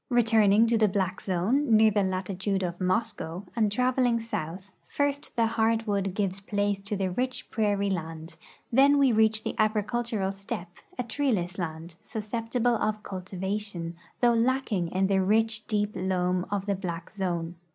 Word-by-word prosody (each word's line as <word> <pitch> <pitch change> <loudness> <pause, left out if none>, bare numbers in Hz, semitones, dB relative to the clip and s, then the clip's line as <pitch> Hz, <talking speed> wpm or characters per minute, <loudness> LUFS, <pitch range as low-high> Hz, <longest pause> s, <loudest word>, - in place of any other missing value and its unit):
Returning 225 -3 +5
to 230 -1 +2
the 215 - +5
black 190 -1 -1
zone, 220 +7 +2
near 220 0 +6
the 205 0 +2
latitude 190 +1 -1
of 175 0 -4
Mo.scow, 185 -2 -1
and 215 -3 +2
traveling 250 +1 +2
south, 190 -4 -5 0.2
first 285 0 -2
the 230 - +3
hardwood 220 -4 0
gives 195 -2 -1
place 205 0 -1
to 205 +1 -3
the 190 -2 -1
rich 255 +6 -3
prairie 205 -2 +1
land; 165 -2 -5 0.4
then 280 +3 +6
we 275 -2 +5
reach 220 -1 +3
the - - -2
agricultural 215 -1 0
steppe, 190 -2 -7 0.2
a 250 - -1
treeless 220 -8 -1
land, 165 0 -5
susceptible 230 +2 -1
of 215 0 -1
cultivation, 185 -1 -4 0.3
though 240 -1 +5
lacking 230 -6 +1
in 190 +3 0
the 195 0 +2
ricli, 220 +3 +1
deep 210 -1 0
loam 180 -1 0
of 200 -1 -2
the 200 - +1
black 180 -3 -5
zone. 175 -4 -2
205 Hz, 155 wpm, -27 LUFS, 185-225 Hz, 0.4 s, near